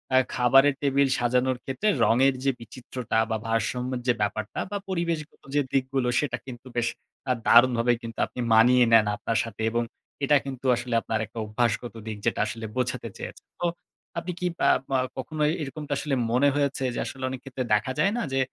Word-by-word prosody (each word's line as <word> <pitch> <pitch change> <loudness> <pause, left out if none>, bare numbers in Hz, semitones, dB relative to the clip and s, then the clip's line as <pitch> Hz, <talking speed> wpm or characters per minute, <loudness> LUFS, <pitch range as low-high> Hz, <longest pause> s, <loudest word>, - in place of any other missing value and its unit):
আ - - +7 0.2
খাবারের 135 +3 +5
টেবিল 140 0 +3
সাজানোর 125 +1 +1
ক্ষেত্রে 135 +11 -2 0.2
রঙের 135 +3 +4
যে 135 - +3
বিচিত্রতা 120 0 -5
বা 110 - 0
ভারসাম্যের 125 +2 -1
যে 125 - +5
ব্যাপারটা 105 +1 -2
বা 205 - -1
পরিবেশগত 170 -4 -3
যে 145 - +4
দিকগুলো 130 -1 +1
সেটা 130 -5 -1
কিন্তু 125 0 -10
বেশ 120 0 +2 0.4
আ - - +5
দারুণভাবে 120 0 +6
কিন্তু 115 -1 -8
আপনি - - -10
মানিয়ে 125 +2 +6
নেন 110 -2 +7
আপনার 115 0 -1
সাথে 115 -1 -8
এবং 120 0 +1 0.4
এটা 145 +1 +4
কিন্তু 130 -1 -7
আসলে 120 0 -4
আপনার 110 -1 -2
একটা 115 +2 -16
অভ্যাসগত 115 +2 -1
দিক 110 -1 -4
যেটা - - +1
আসলে 115 +1 -5
বোঝাতে 125 -2 -2
চেয়েছেন। - - -8
তো 175 - -1 0.5
আপনি 175 +2 -3
কি 180 - 0 0.3
আপ - - -1
আ - - +2 0.2
কখনো 150 +4 -4 0.2
এরকমটা 145 +1 -4
আসলে 145 -2 -1 0.2
মনে 135 +4 +4
হয়েছে 140 -2 0
যে - - -2
আসলে 130 -1 -7
অনেক 130 -1 -5
ক্ষেত্রে 130 -1 -4
দেখা 105 +5 +2
যায় 200 - +3
না - - 0
যে, 135 - +2
125 Hz, 185 wpm, -26 LUFS, 115-135 Hz, 0.5 s, আ